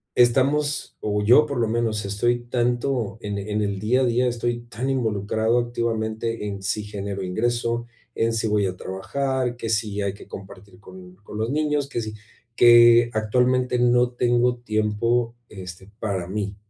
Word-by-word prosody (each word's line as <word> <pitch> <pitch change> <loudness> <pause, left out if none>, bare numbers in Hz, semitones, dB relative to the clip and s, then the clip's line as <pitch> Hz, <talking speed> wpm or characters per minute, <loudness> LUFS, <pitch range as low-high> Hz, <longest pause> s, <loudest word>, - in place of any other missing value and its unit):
estamos, 140 +4 +2
o 105 -1 -1
yo 125 +8 +6
por 140 -4 -3
lo 115 - +2
menos 110 -1 -1
estoy 120 +5 0
tanto 120 -2 -1
en 105 -2 -4
en 105 +1 -2
el 100 -1 -2
día 120 +6 +2
a - - +3
día, 125 +1 +2
estoy 120 0 -2
tan 120 +2 -5
involucrado 110 -2 0
activamente 115 -2 -2
en 100 -1 -6
si 105 +2 -1
genero 100 -1 -5
ingreso, 120 +5 -1 0.3
en 115 0 +1
si 115 0 0
voy 105 -1 +1
a 95 -1 -2
trabajar, 130 +7 -2
que 115 - -5
si 105 -2 -1
hay 100 -1 -1
que - - -14
compartir 95 -1 -11
con 95 -2 -13
con 105 +1 -10
los 110 +3 -1
niños, 150 -1 0
que 120 - -3
si 110 -1 -5 0.4
que 120 0 +7
actualmente 125 +3 +1
no 120 0 +3
tengo 120 0 +1
tiempo, 115 +1 0
este, 95 0 -10
para 95 -5 -2
mí. 100 +1 -3
115 Hz, 165 wpm, -23 LUFS, 105-120 Hz, 0.4 s, que